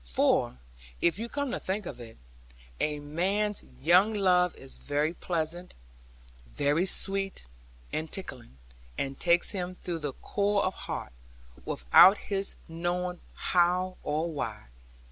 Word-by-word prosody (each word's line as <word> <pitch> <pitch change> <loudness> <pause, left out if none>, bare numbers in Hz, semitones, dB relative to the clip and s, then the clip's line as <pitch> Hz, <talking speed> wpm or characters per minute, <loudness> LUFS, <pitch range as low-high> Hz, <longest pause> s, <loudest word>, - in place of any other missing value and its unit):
For - - +2 0.4
(if 170 +3 +2
you 235 +1 -4
come 285 -1 -2
to - - -2
think 195 +2 -3
of 130 -7 -7
it) 115 -1 -11 0.6
a 150 -1 0
man's 195 +8 -1 0.2
young 185 +7 +5
love 180 -3 +3
is 135 - -6
very 145 +3 0
pleasant, 175 0 -3 0.7
very 145 - +1
sweet, 195 - +1 0.5
and 160 0 -3
tickling; 125 - -7 0.4
and 135 0 -3
takes 175 0 +3
him 185 -2 -3
through 175 -2 -4
the 145 -3 -4
core 200 +5 0
of 185 - 0
heart; - - -6 0.5
without 125 - +7
his 195 -1 -2
knowing 175 +2 -2 0.2
how 180 +1 +1
or 155 +3 -1
why. 140 - -5
175 Hz, 130 wpm, -29 LUFS, 150-195 Hz, 0.7 s, without